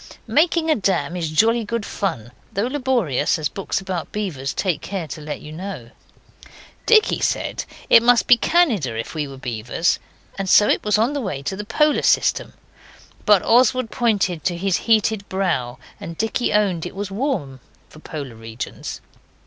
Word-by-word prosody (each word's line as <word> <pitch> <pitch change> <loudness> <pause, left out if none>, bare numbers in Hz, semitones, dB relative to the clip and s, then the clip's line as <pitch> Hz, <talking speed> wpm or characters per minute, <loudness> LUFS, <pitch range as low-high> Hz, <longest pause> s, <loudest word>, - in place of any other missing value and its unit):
Making 325 +1 +2
a - - +4
dam 185 -6 0
is 170 -3 -2
jolly 225 +9 +3
good 225 0 -3
fun, 140 - -3 0.2
though 200 +3 0
laborious, 250 - 0
as 150 -2 -2
books 195 - -3
about 190 -3 -5
beavers 155 -11 -3
take 180 -6 -1
care 185 -4 -4
to 155 - -7
let 150 0 -6
you 150 - -10
know. 165 -8 -7 1.0
Dicky 445 -2 +4
said - - -1 0.2
it 230 - +7
must 240 0 +4
be 245 - +7
Canada 230 - +1
if 115 - -5
we 150 -3 -2
were 135 -1 -10
beavers, 125 +5 -1 0.4
and 195 -1 -2
so 210 - +6
it - - +1
was 210 0 +2
on 230 +6 +1
the 285 - -2
way 150 - -4
to 190 - -3
the 210 +2 -6
Polar 300 +7 +2
system, - - +2 0.7
but 205 -3 +5
Oswald 255 0 +3
pointed 200 -8 0
to 175 -2 -1
his 190 +1 +1
heated 215 -2 +2
brow, 170 -11 -1 0.2
and 165 0 -8
Dicky 225 +2 0
owned 190 -5 +1
it - - -11
was 200 0 -4
warm 195 - -2 0.3
for 155 - -15
Polar 145 -5 -7
regions. 115 +2 -7
195 Hz, 175 wpm, -21 LUFS, 155-230 Hz, 1.0 s, it